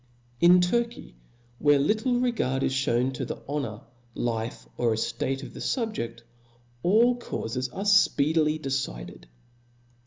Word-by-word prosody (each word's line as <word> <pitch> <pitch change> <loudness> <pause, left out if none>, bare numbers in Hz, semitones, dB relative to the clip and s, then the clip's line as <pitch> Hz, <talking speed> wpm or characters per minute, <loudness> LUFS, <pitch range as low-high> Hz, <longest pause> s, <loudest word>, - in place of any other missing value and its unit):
In 180 +1 +7
Turky, 235 - -1 0.5
where 145 -1 +5
little 220 - +1
regard 180 - 0
is - - +1
(hewn 130 -1 +1
to 125 - -4
the - - -5
honor, 130 -7 -3 0.3
life, 115 -1 -3
or 120 -2 +1
eftate 135 +4 -2
of - - -9
the - - -9
fubje^, 220 - -2 0.6
all 235 - +4
caufes 125 - -4
arc 195 +8 -5
fpeedily 155 -5 +3
decided. 130 - -4
145 Hz, 125 wpm, -26 LUFS, 125-205 Hz, 0.6 s, In